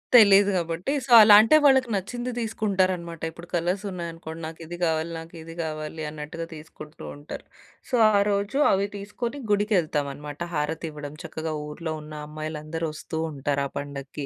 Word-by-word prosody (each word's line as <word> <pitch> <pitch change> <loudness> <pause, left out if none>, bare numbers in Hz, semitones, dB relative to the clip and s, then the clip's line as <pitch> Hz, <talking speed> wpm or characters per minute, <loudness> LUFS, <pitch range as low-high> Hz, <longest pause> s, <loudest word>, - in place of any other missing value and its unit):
తెలీదు 205 -3 +8
గాబట్టి 170 - -1
సో, - - -7
అలా 210 -1 +9
అంటే 225 +8 +5
వాళ్ళకి 265 -3 +5
నచ్చింది 240 +6 -3
తీసుకుంటారనమాట. 185 -7 -1
ఇప్పుడు 170 +2 -12
కలర్స్ 180 +4 0
ఉన్నాయనుకోండి, 165 -2 -7
"నాకిది 165 +2 -8
గావాలి, 160 0 0
నాకిది 165 0 -10
గావాలి" 155 0 -5
అన్నట్టుగా 155 +2 -6
తీసుకుంటూ 155 0 -11
ఉంటారు. 145 +1 -9 0.4
సో, - - +1 0.2
ఆ 200 - +5
రోజు 200 +5 0
అవి 195 +1 +2
తీసుకొని 235 +7 -5
గుడికెళ్తాం 185 -8 +1
అనమాట. 145 +1 -9 0.2
హారతివ్వడం, 150 -1 -3
చక్కగా 160 -1 -4
ఊర్లో 155 +2 -5
ఉన్న 150 0 -10
అమ్మాయిలందరూ 155 +1 -4
ఒస్తూ 160 +1 -5
ఉంటారు 140 0 -1
ఆ - - -17
పండక్కి. 140 0 -6
165 Hz, 145 wpm, -25 LUFS, 155-200 Hz, 0.4 s, అలా